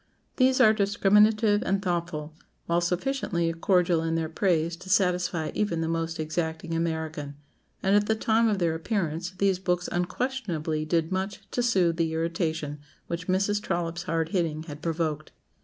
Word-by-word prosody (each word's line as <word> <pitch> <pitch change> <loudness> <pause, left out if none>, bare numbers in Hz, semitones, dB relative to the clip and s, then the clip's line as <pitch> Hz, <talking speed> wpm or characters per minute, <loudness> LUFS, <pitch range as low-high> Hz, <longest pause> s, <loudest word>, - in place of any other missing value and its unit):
These 260 0 +4
are 215 - +7
discriminative 210 +1 +3
and 195 +1 +1
thoughtful, 170 -5 -3 0.3
while 170 +1 +1
sufficiently 175 -2 -1
cordial 175 -1 +2
in 165 0 -1
their 160 -1 -1
praise 170 -1 +1
to 185 +2 -12
satisfy 180 -5 +1
even 175 -6 0
the 160 - -1
most 165 0 -2
exacting 160 +1 -3
American; 160 -3 -3 0.5
and 195 +1 +3
at 205 0 +3
the 220 - +2
time 225 +1 +2
of 210 -2 +1
their 170 -3 +1
appearance 170 -1 -2
these 195 -1 +2
books 180 -1 -1
unquestionably 175 - -2
did 165 +1 0
much 190 +2 -2
to 245 - 0
soothe 185 -8 +2
the 165 -2 0
irritation 160 -3 -2 0.3
which 170 +1 -5
Mrs. 195 +2 +1
Trollope's 170 -4 -2
hard 165 -1 0
hitting 165 -4 -1
had 150 -2 -9
provoked. 160 -2 -2
175 Hz, 155 wpm, -27 LUFS, 160-195 Hz, 0.5 s, are